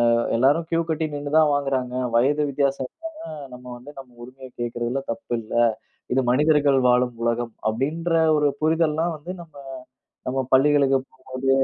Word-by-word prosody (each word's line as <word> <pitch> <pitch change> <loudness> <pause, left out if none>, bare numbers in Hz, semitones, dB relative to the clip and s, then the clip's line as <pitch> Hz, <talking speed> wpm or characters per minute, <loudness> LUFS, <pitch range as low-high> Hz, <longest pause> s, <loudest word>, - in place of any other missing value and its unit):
அ - - +2 0.2
எல்லாரும் 145 +7 +3
க்யூ 165 0 +2
கட்டி 160 0 0
நின்னு 145 +1 -3
தான் 155 -2 +4
வாங்குறாங்க, 135 -3 -1 0.2
வயது 145 +5 +2
வித்தியாசம் 135 -1 0
இல்லாம, 325 0 -9 0.4
நம்ம 125 0 -14
வந்து 135 +4 -12
நம்ம 130 -2 -12
உரிமைய 130 +1 -11
கேக்கிறதுல 120 +2 -2
தப்பு 115 - -6
இல்ல, 110 - -10 0.6
இது 130 - +3
மனிதர்கள் 145 0 +3
வாழும் 125 0 +2
உலகம், 120 0 -1
அப்படின்ற 150 +10 -1 0.3
ஒரு 150 -1 +3
புரிதல்லாம் 160 +1 +1
வந்து, 150 +4 -8
நம்ம 160 -3 -22 0.7
நம்ம 130 +1 -1
பள்ளிகளுக்கு 135 0 +4
போம்போது, 130 0 -4
135 Hz, 150 wpm, -23 LUFS, 125-150 Hz, 0.7 s, தான்